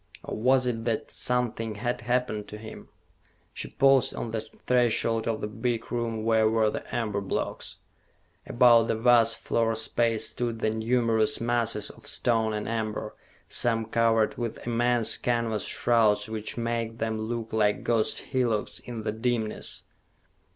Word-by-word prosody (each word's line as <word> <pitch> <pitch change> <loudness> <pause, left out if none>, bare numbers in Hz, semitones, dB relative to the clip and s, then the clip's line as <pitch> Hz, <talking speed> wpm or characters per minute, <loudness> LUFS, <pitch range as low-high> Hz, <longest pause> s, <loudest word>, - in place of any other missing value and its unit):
Or - - -5
was 130 +3 +3
it 115 -2 -2
that 115 -2 -2
something 115 -3 -1
had 120 +3 -2
happened 125 -4 -1
to 105 - -8
him? 110 0 -11 0.6
She - - -6
paused 135 -1 +3
on 115 - -4
the 110 -1 -2 0.2
threshold 115 -2 +2
of 115 -1 -1
the - - -2
big 115 +1 -3
room 115 -2 -2
where 110 -1 +3
were 110 -1 +2
the - - -5
amber 105 -4 -1
blocks. 100 - -4 0.7
About 120 -2 +5
the - - 0
vast 115 0 +4
floor 115 -1 0
space 115 0 +1
stood 120 -2 -3
the 110 -1 0
numerous 115 +1 +1
masses 120 -1 0
of - - -16
stone 115 -2 +1
and 105 -1 -3
amber, 110 -1 -3 0.3
some 115 -2 +1
covered 115 0 +1
with 120 -2 -4
immense 120 -1 +2
canvas 115 -3 -1
shrouds 110 -3 +2
which 110 0 -5
made 115 -1 -2
them 110 -1 -2
look 115 0 -4
like 105 -2 +1
ghost 115 -2 +1
hillocks 120 -5 0
in 115 -3 -7
the 105 - -1
dimness. 110 -1 -2
115 Hz, 150 wpm, -27 LUFS, 110-120 Hz, 0.7 s, About